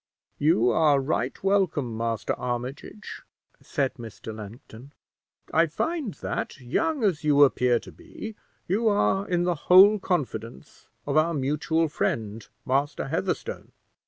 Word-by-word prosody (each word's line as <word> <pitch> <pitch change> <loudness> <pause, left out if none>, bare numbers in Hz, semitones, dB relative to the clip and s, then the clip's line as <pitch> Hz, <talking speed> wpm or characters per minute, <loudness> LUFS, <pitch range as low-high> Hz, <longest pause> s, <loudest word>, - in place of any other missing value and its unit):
"You 135 -6 +3
are 145 +2 +4
right 135 0 -2
welcome, 185 - +1
Master 115 -1 -2
Armitage," 125 - -6 0.4
said 135 -2 -1
Mr. 110 -1 -8
Langton; 110 +5 -11 0.6
"I 165 +2 +4
find 280 - -3
that, - - -4
young 280 - -1
as 180 -7 +1
you 145 -1 +5
appear 125 -3 +3
to - - -12
be, 220 - -9 0.3
you 215 +6 +1
are 205 -1 +2
in 175 -1 +1
the 175 0 +1 0.2
whole 200 +4 +8
confidence 135 - -4 0.2
of 145 +1 0
our 160 +1 +3
mutual 150 +4 0
friend, 110 -6 -3 0.2
Master 140 +3 -1
Heatherstone. - - -3
145 Hz, 130 wpm, -26 LUFS, 125-180 Hz, 0.6 s, whole